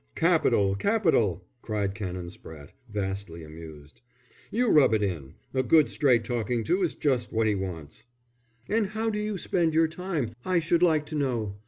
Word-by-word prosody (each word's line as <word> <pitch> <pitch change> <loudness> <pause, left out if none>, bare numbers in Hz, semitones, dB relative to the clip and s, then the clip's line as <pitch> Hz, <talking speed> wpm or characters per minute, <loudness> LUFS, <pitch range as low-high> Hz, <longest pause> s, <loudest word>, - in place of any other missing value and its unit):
"Capital! 100 -1 +3
Capital!" 115 - +1 0.2
cried 105 -3 -2
Canon 90 -4 -5
Spratte, 75 -5 -12 0.2
vastly 95 -5 -4
amused. 80 +1 -12 0.5
"You 240 +1 +1
rub 135 -7 +5
it 105 - 0
in. 80 -9 -4 0.2
A 130 - +2
good 150 +5 +4
straight 125 -5 +3
talking 115 0 -2
to 180 - +1
is 175 - 0
just 125 -6 0
what 115 0 +1
he 110 - +2
wants!" 95 +1 -6 0.6
"And 215 -1 +1
how 220 +2 -2
do 210 - -2
you 210 -1 -2
spend 170 -3 0
your 165 0 +4
time, 160 -8 -3
I 185 -1 +1
should 170 +1 +2
like 160 -4 +3
to 155 +1 -6
know. 120 -8 -1
115 Hz, 170 wpm, -27 LUFS, 95-165 Hz, 0.6 s, rub